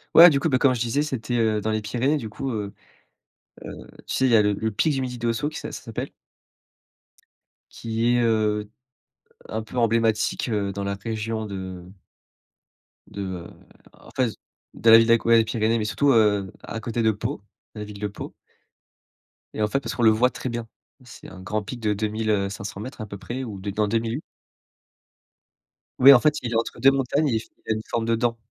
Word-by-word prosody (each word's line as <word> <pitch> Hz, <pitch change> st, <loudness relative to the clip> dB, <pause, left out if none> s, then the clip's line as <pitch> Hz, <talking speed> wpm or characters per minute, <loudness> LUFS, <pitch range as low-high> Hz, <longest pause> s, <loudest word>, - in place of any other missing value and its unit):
Ouais, 175 Hz, +2 st, +11 dB
du 140 Hz, -4 st, +1 dB
coup, 160 Hz, -, 0 dB
ben 130 Hz, -, +3 dB
comme 130 Hz, -1 st, +4 dB
je 120 Hz, -, -3 dB
disais, 120 Hz, +4 st, 0 dB
c'était, 120 Hz, -4 st, -3 dB
heu, 110 Hz, -2 st, +1 dB
dans 110 Hz, -, -2 dB
les 110 Hz, -, -1 dB
Pyrénées 125 Hz, +7 st, 0 dB
du 115 Hz, -6 st, -6 dB
coup, 135 Hz, +5 st, -5 dB
heu 105 Hz, -3 st, -4 dB, 1.1 s
heu, -, -, -17 dB
tu -, -, -3 dB
sais, 130 Hz, -, +2 dB
il 130 Hz, -, +3 dB
y -, -, +6 dB
a 110 Hz, -, +6 dB
le 105 Hz, 0 st, +2 dB
le 110 Hz, +2 st, -2 dB
pic 150 Hz, +9 st, +1 dB
du 135 Hz, -, -1 dB
Midi 125 Hz, -1 st, -4 dB
d'Ossau 120 Hz, +5 st, -1 dB
qui 150 Hz, -, -8 dB
ça -, -, -6 dB
ça -, -, -7 dB
s'appelle 115 Hz, -3 st, -5 dB, 1.6 s
qui 115 Hz, +2 st, -1 dB
est, 120 Hz, -, +3 dB
heu, 105 Hz, -2 st, +1 dB, 0.8 s
un 110 Hz, 0 st, -3 dB
peu 110 Hz, -, -11 dB
emblématique, 115 Hz, -1 st, +1 dB
heu, 100 Hz, -3 st, -1 dB
dans 100 Hz, +1 st, -4 dB
la 100 Hz, 0 st, -2 dB
région 110 Hz, +2 st, -4 dB
de 95 Hz, -3 st, -7 dB, 1.2 s
de, 100 Hz, -, -7 dB
heu, 90 Hz, -3 st, -5 dB, 0.5 s
en -, -, -17 dB
fait, 125 Hz, -4 st, 0 dB, 0.4 s
d'à 115 Hz, -, +3 dB
la 115 Hz, -, +11 dB
ville 115 Hz, 0 st, +4 dB
d'Aque 115 Hz, -1 st, +3 dB
les 115 Hz, -1 st, +5 dB
Pyrénées, 110 Hz, 0 st, 0 dB
mais 110 Hz, -, -1 dB
surtout, 110 Hz, +8 st, +2 dB
heu, 105 Hz, -5 st, +3 dB
à 115 Hz, -, -5 dB
côté 115 Hz, +1 st, -3 dB
de 110 Hz, -, +4 dB
Pau, 115 Hz, +4 st, -4 dB, 0.3 s
la 105 Hz, -, -5 dB
ville 105 Hz, -1 st, -10 dB
de 105 Hz, -, -2 dB
Pau. 100 Hz, -, -8 dB, 1.2 s
Et -, -, -4 dB
en 105 Hz, -, +3 dB
fait, 135 Hz, +6 st, 0 dB
parce 115 Hz, -4 st, -5 dB
qu'on 120 Hz, -, -1 dB
le 110 Hz, -, +8 dB
voit 120 Hz, +4 st, +3 dB
très 130 Hz, -, -5 dB
bien. 120 Hz, -1 st, -4 dB, 0.4 s
C'est 120 Hz, -, -12 dB
un 95 Hz, -, -12 dB
grand 105 Hz, +3 st, -2 dB
pic 120 Hz, +4 st, -7 dB
de 105 Hz, -2 st, 0 dB
2000, 110 Hz, +1 st, -2 dB
heu, 100 Hz, -2 st, +1 dB
500m 100 Hz, +5 st, -7 dB
à -, -, -4 dB
peu 100 Hz, -1 st, -8 dB
près 120 Hz, +7 st, -5 dB
ou 105 Hz, -6 st, -7 dB
non, 100 Hz, +1 st, -4 dB
dans 105 Hz, +1 st, 0 dB
2000. 115 Hz, +3 st, -1 dB, 1.8 s
Oui, 140 Hz, +2 st, +10 dB
en 125 Hz, -, +7 dB
fait, 150 Hz, +3 st, +2 dB
il 120 Hz, -, -3 dB
est -, -, -2 dB
entre 115 Hz, 0 st, -1 dB
2 135 Hz, +3 st, +6 dB
montagnes 135 Hz, +3 st, +1 dB
et -, -, 0 dB
il -, -, +1 dB
fa -, -, -12 dB, 0.2 s
il -, -, 0 dB
a -, -, +2 dB
une 110 Hz, -, -4 dB
forme 115 Hz, -1 st, -1 dB
de 115 Hz, 0 st, +2 dB
dent 115 Hz, 0 st, 0 dB
115 Hz, 220 wpm, -24 LUFS, 105-120 Hz, 1.8 s, Ouais